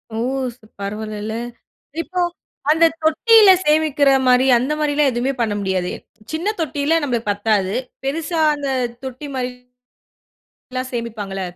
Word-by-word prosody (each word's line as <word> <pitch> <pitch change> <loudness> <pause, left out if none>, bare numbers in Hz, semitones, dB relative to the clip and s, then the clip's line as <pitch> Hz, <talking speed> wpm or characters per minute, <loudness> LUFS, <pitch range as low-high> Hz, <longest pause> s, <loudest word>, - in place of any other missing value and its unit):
ஓ! - - -3 0.4
ச - - -39 0.2
பரவால்லல. 210 +1 -4 0.7
இப்போ 360 +2 -5 0.5
அந்த 325 +2 +5 0.2
தொட்டில 410 +7 +6 0.2
சேமிக்குற 300 -2 +3 0.2
மாரி 250 +1 +5
அந்த 255 +5 -1
மாரில்லாம் 295 -1 +2
எதுவுமே 245 +3 -1
பண்ண 220 -3 0
முடியாது? 185 -2 -1 0.4
சின்ன 355 +7 -1
தொட்டில 305 +2 +1
நமக்கு 235 -5 -2
பத்தாது. 205 -1 0 0.3
பெரிசா 320 +4 -2 0.2
அந்த 285 -1 -4 0.4
தொட்டி 260 +3 -7
மாரி 250 -1 -2 1.2
எல்லாம் 255 0 -3
சேமிப்பாங்கல்ல. 215 -5 -4
260 Hz, 120 wpm, -20 LUFS, 220-305 Hz, 1.2 s, தொட்டில